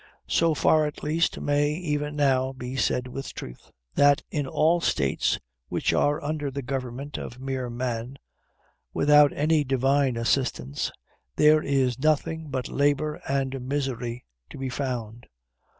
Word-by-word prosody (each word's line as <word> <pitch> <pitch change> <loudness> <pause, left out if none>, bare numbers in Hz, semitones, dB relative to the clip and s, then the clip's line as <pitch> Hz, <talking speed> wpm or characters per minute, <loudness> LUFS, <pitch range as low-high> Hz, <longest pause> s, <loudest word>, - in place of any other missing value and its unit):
So 165 -2 +2
far, 155 +1 +3
at 150 - -8
least, 160 +3 +1
may 145 +1 +1
even 150 -3 -2
now 135 -2 +2
be 130 0 -6
said 125 0 0
with 135 +2 -7
truth, - - -9 0.2
that 145 0 +4
in 145 -3 -1
all 165 +5 +2
states 70 - +1 0.3
which - - 0
are 145 0 +2
under 150 -1 -2
the 140 +1 -5
government 130 +2 -4
of 120 - -8
mere 130 -2 -3
man, 120 +1 -4 0.8
without 145 0 +6
any 155 +1 +2
divine 135 -1 +2
assistance, 115 - -1 0.4
there 155 0 +5
is 130 -4 +1
nothing 155 +1 0
but 130 -2 -3
labor 145 +1 0
and 135 -1 -1
misery 125 -4 -3 0.2
to - - -10
be 135 0 -3
found. 120 -3 -4
135 Hz, 140 wpm, -26 LUFS, 125-150 Hz, 0.8 s, without